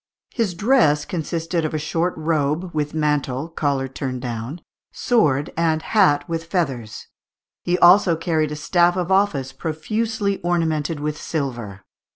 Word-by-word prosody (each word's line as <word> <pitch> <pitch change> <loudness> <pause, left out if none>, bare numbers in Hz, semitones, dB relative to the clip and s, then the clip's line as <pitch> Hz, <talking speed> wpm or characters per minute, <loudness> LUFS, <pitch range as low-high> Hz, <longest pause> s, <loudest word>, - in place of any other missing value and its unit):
His 220 -7 -1
dress 170 - +3
consisted 165 0 -2
of 155 0 -2
a - - +1
short 165 +4 -1
robe, 155 +2 -1
with 150 0 -2
mantle, 150 -1 -1
collar 140 -5 -1
turned 130 -1 -5
down, 120 +7 -5 0.3
sword, 150 - +1
and 160 -1 +1
hat 160 -9 +3
with 165 -1 -3
feathers; 135 - -3 0.6
he 175 0 +1
also 180 0 +6
carried 160 -2 0
a - - -3
staff 175 +4 +2
of 180 0 -2
office, 170 -10 +1
profusely 200 +6 -2
ornamented 165 -3 0
with 150 0 -3
silver. 120 - -4
160 Hz, 140 wpm, -21 LUFS, 145-175 Hz, 0.6 s, also